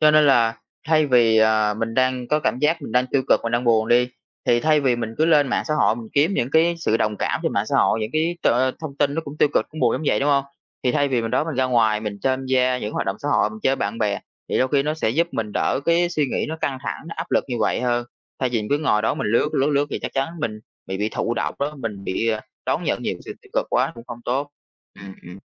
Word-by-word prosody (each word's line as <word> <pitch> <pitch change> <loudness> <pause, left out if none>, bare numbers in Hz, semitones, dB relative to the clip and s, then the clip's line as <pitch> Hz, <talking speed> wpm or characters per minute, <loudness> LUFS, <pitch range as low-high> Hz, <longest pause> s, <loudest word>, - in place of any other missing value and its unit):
cho 155 -1 +6
nên 155 -1 +5
là 115 -4 +4 0.3
thay 155 -1 +4
vì, 120 -4 +4
ờ, 110 -1 +3
mình 115 0 -2
đang 130 -1 +1
có 150 0 +2
cảm 120 -2 0
giác 155 +2 +1
mình 110 - -7
đang 125 +1 +2
tiêu 130 +1 0
cực, - - +4
mình 115 - -3
đang 120 +1 +1
buồn 110 -1 +3
đi. 125 +1 +4 0.4
Thì 120 0 +3
thay 155 -1 +3
vì 130 -3 +2
mình 115 -1 -4
cứ 155 - +4
lên 150 -4 +4
mạng 120 - 0
xã 155 - +1
hội 110 -5 +2
mình 115 -2 -8
kiếm 150 +6 +3
những 120 -5 -1
cái 165 +3 +3
sự 110 -9 +1
đồng 105 -2 -1
cảm - - -1
trên - - -1
mạng - - 0
xã - - 0
hội, 110 - +3
những 110 - -3
cái 165 +3 0
t - - +1 0.3
thông 150 -4 -7
tin 145 0 +1
nó 165 - 0
cũng 145 +1 -8
tiêu - - +4
cực, - - +2
cũng 155 - -8
buồn - - +3
giống - - -2
vậy, - - +2
đúng 140 - +1
hông? 140 -1 +3 0.4
Thì 125 - +2
thay 145 +2 +2
vì 125 -3 0
mình 115 - -3
đó, 130 +5 +1
mình 160 -3 -4
ra 130 - +1
ngoài 110 -4 +2
mình 105 -2 -5
tham 130 0 0
gia 130 -1 +2
những - - -9
cái 105 - -3
hoạt - - -3
động 95 - -1
xã 145 - -4
hội, 145 - +2
mình 220 - -10
chơi 135 0 +2
bạn 100 +3 -3
bè 105 -3 0 0.3
thì - - 0
đôi 130 - +2
khi 140 -1 +2
nó 150 +2 -1
sẽ 155 - 0
giúp 165 +8 +1
mình 105 -2 -3
đỡ - - 0
cái 170 +2 +3
suy 155 -4 0
nghĩ - - -2
nó 160 - -4
căng 135 -2 -1
thẳng, - - -4
nó 165 - -7
áp 165 +2 -5
lực - - +2
như 125 - -2
vậy - - +1
hơn. 120 -1 0 0.4
Thay 130 - +1
vì 120 -2 0
mình 105 - -6
cứ 145 - +3
ngồi 105 -8 +1
đó 110 - +1
mình - - -3
lướt, 115 +7 +2
lướt, 140 +3 +2
lướt 145 0 +2
thì - - -2
chắc - - -4
chắn 135 +2 0
mình 110 -7 -3 0.3
bị 95 - -4
bị 105 +2 -1
thụ 115 +1 -2
động - - -2
đó, 145 +2 -2
mình 105 -6 -5
bị, 115 +5 -1
à, 110 -1 0 0.3
đón - - 0
nhận - - -1
nhiều - - -1
cái - - -13
sự - - -6
tiêu - - -20
cực - - 0
quá - - +1
cũng 115 0 -12
không 120 -1 -8
tốt. 140 +4 -1 0.5
Ừm, 95 -1 -10
ừm. 90 +2 -11
130 Hz, 305 wpm, -22 LUFS, 115-145 Hz, 0.5 s, cho